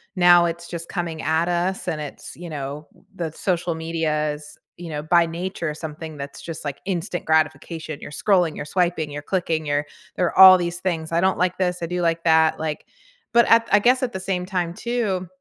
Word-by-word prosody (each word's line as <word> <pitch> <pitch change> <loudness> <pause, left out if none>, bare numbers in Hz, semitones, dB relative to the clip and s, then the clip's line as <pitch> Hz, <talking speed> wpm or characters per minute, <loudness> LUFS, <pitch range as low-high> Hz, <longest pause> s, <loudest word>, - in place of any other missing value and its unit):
now 175 -1 +6
it's 170 0 -4
just 170 -1 -7
coming 170 -3 -4
at 160 +2 +1
us 175 +2 -1
and 155 - -2
it's, 150 -2 -8
you 175 0 -9
know, 145 +1 -6 0.3
the 165 -3 -3
social 175 +1 -1
media 160 -2 -1
is, 150 0 -11 0.2
you 175 -1 -8
know, 150 -1 -4
by 170 +2 +3
nature, 170 -1 -4
something 155 0 -8
that's 140 0 -7
just 165 -2 -7
like 145 -2 -5
instant 175 -2 -3
gratification. 160 0 -1
You're - - -9
scrolling, 175 -1 +2
you're - - -5
swiping, 170 -2 0
you're 145 0 -6
clicking, 165 -3 -1
you're 145 0 -1 0.3
you're 180 -2 0
all 190 0 +11
these 175 0 -3
things. 165 -4 -3
"I 170 +1 +2
don't 190 +1 +2
like 180 0 0
this." 180 -1 0
"I - - -1
do 180 +1 -2
like 165 -1 0
that." 160 -1 +4
Like 155 -1 -4 0.5
but 235 -1 +5
I 230 0 +7
I 205 - +6
guess 250 +5 +3
at 245 -2 -2
the 190 - -4
same 185 -1 -2
time 180 -3 -2
too, 215 -7 -2
170 Hz, 205 wpm, -22 LUFS, 155-180 Hz, 0.5 s, all